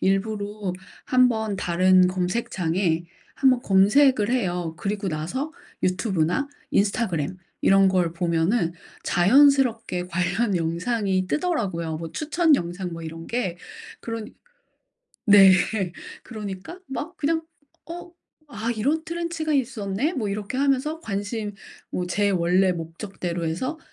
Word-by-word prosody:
일부러 205 0 -1 0.4
1 255 -2 +5
번 220 -3 -2
다른 185 +1 +4
검색창에 180 -3 -1 0.3
1 270 - +5
번 255 -1 +2
검색을 210 +4 +4
해요. 180 -9 -1
그리고 200 -1 -2
나서 180 - -3 0.3
유튜브나 185 - 0 0.2
인스타그램 185 -5 0 0.3
이런 195 0 +5
걸 180 -3 +1
보면은 170 +2 +1 0.3
자연스럽게 235 -2 +4
관련 185 +4 0
영상이 185 +3 0
뜨더라고요 185 - -1
뭐 165 -1 -7
추천 315 0 +2
영상 175 -1 -4
뭐 165 - -7
이런 165 +1 -7
게 230 -8 -2 0.4
그런 230 -2 -5 1.0
네. 200 -2 +8 0.7
그러니까 210 - -7
막 315 +6 -5
그냥 320 +2 0 0.5
어 350 +1 -8 0.4
'아 230 -3 -3
이런 300 +9 0
트렌치가 335 -2 -3
있었네?' 245 - -1
뭐 215 -6 -2
이렇게 205 +4 -4
하면서 280 +3 +1
관심 205 -1 -4 0.4
뭐 180 - -2
제 205 +3 +1
원래 180 +1 +3
목적대로 170 +1 -5
해서 255 - -3
200 Hz, 250 characters per minute, -24 LUFS, 180-255 Hz, 1.0 s, 네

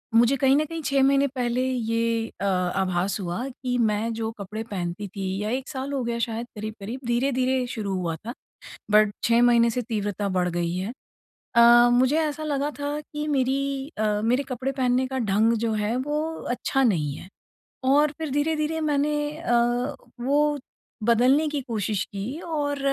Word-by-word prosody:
मुझे 240 +4 +5
कहीं 270 +1 +4
न 305 - +2
कहीं 330 +1 -5
6 275 -1 +2
महीने 275 +1 +4
पहले 245 0 0
ये 230 -1 0
अ, - - 0
आभास 185 0 0
हुआ 180 +7 -3
कि 250 -1 -3
मैं 220 0 +1
जो 225 0 -3
कपड़े 210 +3 -5
पहनती 185 +1 -3
थी 195 0 -5 0.2
या 210 - -2
1 260 +3 -3
साल 275 0 -4
हो 270 -2 -1
गया 235 0 -2
शायद 230 0 -2
करीब-करीब 215 +3 -6
धीरे-धीरे 255 +1 +1
शुरू 215 -5 -3
हुआ 170 -2 -2
था, 230 +8 -7 0.6
बट 210 -1 +5
6 235 +1 +4
महीने 235 -1 +5
से 250 +2 -2
तीव्रता 205 -3 -2
बढ़ 180 0 +1
गई 170 0 -1
है। 190 +5 -3 0.6
अ, 240 +1 +8
मुझे 255 +4 +3
ऐसा 310 0 -2
लगा 290 -1 -1
था 290 +1 -2
कि 300 0 -3
मेरी 275 0 0
अ, 210 -1 +1
मेरे 250 +4 +2
कपड़े 255 +2 -2
पहनने 255 -1 +1
का 265 0 -3
ढंग 220 +4 +3
जो 225 - 0
है 225 +3 0
वो 295 +4 -1 0.3
अच्छा 250 +2 0
नहीं 155 - +1
है 180 - -11 0.7
और 295 +1 +4
फिर 315 -2 -3
धीरे-धीरे 305 +2 0
मैंने 295 -1 +1 0.2
अ, 330 -6 -1 0.7
वो 290 +3 +2 0.5
बदलने 250 +7 +4
की 295 -1 -2
कोशिश 215 -5 -2
की 210 +10 -5
और 290 -4 -2
245 Hz, 175 wpm, -25 LUFS, 215-275 Hz, 0.7 s, अ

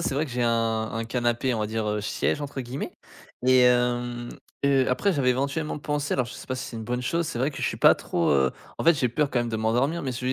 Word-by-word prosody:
c'est - - -1
vrai 145 +3 +1
que 140 - -9
j'ai 125 0 -1
un 115 -1 +1
un 115 +1 -3
canapé, 120 +2 0
on 115 - -1
va 105 - 0
dire, 110 0 -2
heu, 105 0 -1
«siège» 110 +7 -1
entre 140 -2 -4
guillemets. 125 +3 -5 0.5
Et 130 0 +6
hem, 120 -1 +1 0.4
heu, 135 -2 +3
après 190 +10 +1
j'avais 130 -4 +2
éventuellement 140 +5 -1
pensé 145 -1 -2
alors 130 -2 +1
je 120 - -9
sais - - -10
pas 130 - -2
si 130 +1 -4
c'est 115 - -7
une 110 - -6
bonne 125 +2 -2
chose, 165 +6 0
c'est 120 - -4
vrai 130 +4 +1
que 140 - -9
je - - +2
suis - - -2
pas - - +7
trop, 85 - -1
heu 65 -2 +3 0.3
en - - -4
fait 170 - +7
j'ai 135 -4 +1
peur 145 +4 0
quand 125 - +1
même 120 0 -1
de 110 - -2
m'endormir, 125 +10 +1
mais 130 -2 -2
ce 120 - -5
que 125 - -3
je 130 - +2
125 Hz, 290 wpm, -26 LUFS, 115-140 Hz, 0.5 s, pas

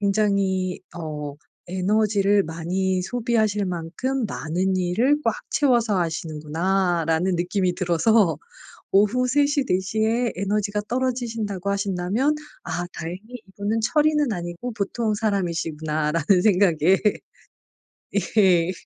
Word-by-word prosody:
'굉장히 195 -3 +1 0.2
어 150 -3 -5 0.3
에너지를 200 +1 +2
많이 180 +3 -1
소비하실 220 -2 0
만큼 180 +10 -2
많은 185 +1 -1
일을 205 +11 +2
꽉 230 - +2 0.2
채워서 235 -8 +2
하시는구나.'라는 165 +2 0
느낌이 180 +1 0
들어서 180 0 +3 0.6
오후 220 +6 +3
3:00, 285 +1 +2
4:00 190 0 0
에 235 +2 +1
에너지가 205 +1 -1
떨어지신다고 230 -6 -2
하신다면 200 +8 0 0.3
'아 175 +1 -3
다행히 170 +3 -6 0.3
이분은 205 +3 -2
철인은 295 +2 +2
아니고 175 +6 -5
보통 215 +1 -1
사람이시구나.' 165 -7 -1
라는 175 +3 +3
생각에 185 -3 +4 1.4
예. 180 -3 +4
195 Hz, 260 characters per minute, -23 LUFS, 175-220 Hz, 1.4 s, 생각에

